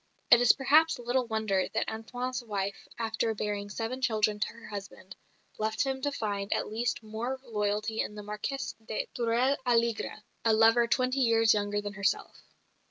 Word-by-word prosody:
It 240 - +9
is 245 - +7
perhaps 305 +4 +4
little 245 +1 0
wonder 215 -4 0
that 225 - +1
Antoine's 245 +3 -4
wife, 200 -3 -4
after 225 0 -1
bearing 205 -1 -3
seven 230 +5 -4
children 215 -4 +1
to - - +1
her 235 - -11
husband, 195 -2 -8 0.4
left 220 +5 0
him 265 -1 -2
to 285 +1 0
find 205 -6 -3
at - - -1
least 230 +1 -1
more 230 +5 -4
loyalty 215 -1 -1
in 210 - -4
the 210 - -7
Marquess 210 +7 -4
of 220 - -28 0.3
Tourel 245 +4 +2
Alégre, 235 -2 0 0.2
a 225 - +4
lover 225 +2 +5
twenty 255 +2 +1
years 225 -3 +4
younger 205 0 0
than 205 0 -5
herself. 200 -1 -1
225 Hz, 165 wpm, -29 LUFS, 210-245 Hz, 0.4 s, It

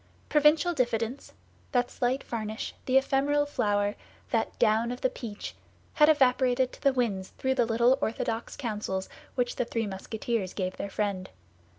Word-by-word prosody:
Provincial 305 +3 +4
diffidence, 240 -2 -1 0.4
that 245 -1 +2
slight 255 +2 0
varnish, 220 -1 -4
the 260 0 +5
ephemeral 280 +2 +2
flower, 205 -7 0 0.4
that 225 -2 0
down 230 +1 +3
of 245 - -6
the 260 - +2
peach, 220 -4 -7 0.4
had 300 0 +6
evaporated 255 -3 +3
to - - -13
the 275 - +4
winds 220 -8 -1
through 265 0 +1
the 245 -3 +2
little 240 +4 +3
orthodox 225 +1 -2
counsels 210 -6 -3 0.3
which 245 -1 -1
the 245 - +1
three 230 -1 -2
Musketeers 205 +1 -3
gave 185 -2 -2
their 200 - -4
friend. 195 -2 -2
240 Hz, 155 wpm, -28 LUFS, 215-265 Hz, 0.4 s, had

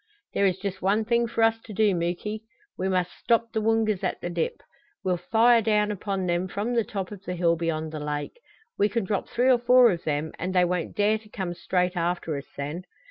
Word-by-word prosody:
"There 200 - +3
is 185 -1 0
just 195 -1 -5
one 205 +4 +2
thing 235 +1 +2
for 230 0 0
us 225 0 +3
to 220 - -10
do, 210 -1 +3
Muky. 180 +5 -2 0.3
We 190 +1 -2
must 180 -1 0
stop 230 -1 +1
the 220 - -1
Woongas 220 -2 +1
at - - -1
the 175 - -4
dip. 170 -2 -2 0.4
We'll 185 -1 +1
fire 230 +1 +5
down 210 -1 +2
upon 195 -1 -3
them 175 +1 0
from 205 +6 -2
the 230 -1 +2
top 195 -2 -5
of 200 -2 -9
the 180 - -4
hill 170 -1 +2
beyond 160 -1 -2
the 155 - -5
lake. 150 - -4 0.4
We 205 - +4
can 230 -1 -1
drop 200 0 -2
three 250 +2 +3
or 245 - +4
four 245 -1 +6
of 175 -2 -4
them 150 +1 -1
and 185 +1 -3
they 180 -1 +5
won't 175 -1 -2
dare 210 +1 +3
to 215 0 -19
come 190 -4 -4
straight 180 +1 0
after 170 -2 -1
us 140 0 -6
then. 150 +6 -4
190 Hz, 230 wpm, -26 LUFS, 175-220 Hz, 0.4 s, four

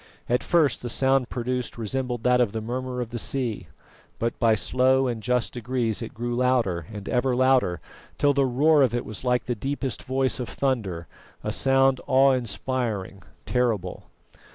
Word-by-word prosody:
At 125 +1 +1
first 155 -7 +2
the 120 - -4
sound 130 0 +2
produced 125 0 -3
resembled 120 +1 -3
that 125 0 +4
of 115 -5 +1
the 110 - -2
murmur 125 +2 -4
of 120 - -4
the 120 - -2
sea; 125 -3 -2 0.5
but 115 0 -2
by 115 -2 +4
slow 130 +4 +2
and 120 -3 -2
just 125 +1 0
degrees 120 -2 -1
it 115 - -7
grew 120 +2 -3
louder 120 -10 +1
and 105 -2 -8
ever 125 0 +1
louder, 130 -9 +3 0.4
till 145 -1 +3
the 140 0 +2
roar 145 +5 +4
of 125 -3 +3
it 120 - -2
was 110 +2 -7
like 125 -1 +1
the 125 - -2
deepest 135 +1 -3
voice 130 0 0
of 125 - -4
thunder, 105 -11 -2 0.4
a - - -2
sound 135 -1 +3
awe 135 +1 +5
inspiring, 115 -4 -2 0.2
terrible. 115 -8 -1
125 Hz, 175 wpm, -25 LUFS, 115-130 Hz, 0.5 s, awe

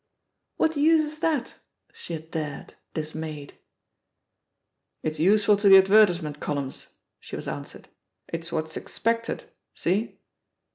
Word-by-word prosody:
What 320 0 +2
use 315 +2 +5
is 305 0 -6
that?" 310 -6 -1 0.4
she 170 - -8
had 160 0 -7
dared, 150 -3 -5 0.2
dismayed. 155 -2 -5 1.5
It's 155 -1 -2
useful 205 +4 +4
to 200 0 +4
the 195 - +11
advertisement 190 -6 +4
columns," 140 -3 -4 0.2
she - - -8
was - - -6
answered; - - -7 0.4
"it's 165 0 -3
what's 160 -1 -2
expected. 230 +1 -2 0.3
See 195 +7 -1
175 Hz, 115 wpm, -26 LUFS, 155-230 Hz, 1.5 s, the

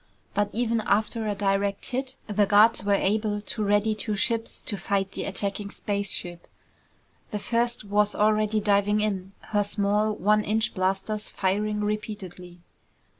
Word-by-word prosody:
But 205 0 +1
even 230 -1 0
after 220 +2 0
a 205 - -1
direct 200 0 0
hit, 260 +1 -3
the 210 -1 +1
guards 210 0 +5
were 200 0 +3
able 210 +1 0
to 215 +1 -3
ready 205 +1 +2
two 210 0 -1
ships 225 +2 -1
to 205 - -3
fight 195 -1 -1
the - - -4
attacking 200 +1 -2
spaceship. 200 -4 -3 0.8
The 210 - -3
first 235 +2 0
was 205 0 +1
already 215 0 +2
diving 205 0 +2
in, 195 -2 -2 0.2
her 205 0 +3
small 205 +1 +1
one 210 0 +2
inch 220 +2 0
blasters 195 +3 -1
firing 210 +2 -1
repeatedly. 200 -4 -5
210 Hz, 145 wpm, -26 LUFS, 200-215 Hz, 0.8 s, guards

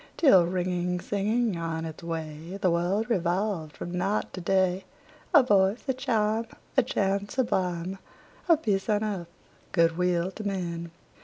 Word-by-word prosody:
Till, 190 - +6
ringing, 180 0 -1
singing 210 +2 0
on 165 -1 -3
its 160 -1 -7
way, 165 +1 -5
The 185 -2 +2
world 180 +6 +1
revolved 180 -5 -1
from 175 +1 -5
night 195 +4 -1
to 185 - -6
day, 190 +1 +1 0.5
A 295 -7 +7
voice, 200 -1 +3
a 265 - +2
chime, 225 -4 0 0.3
A 265 - +6
chant 200 -4 -1
sublime 185 -7 -1 0.5
Of 325 -2 +5
peace 195 -1 0
on 210 0 +2
earth, 195 -5 -3 0.4
good 165 -1 +2
will 180 0 +1
to 215 - -8
men! 170 -4 -3
190 Hz, 150 wpm, -27 LUFS, 170-210 Hz, 0.5 s, A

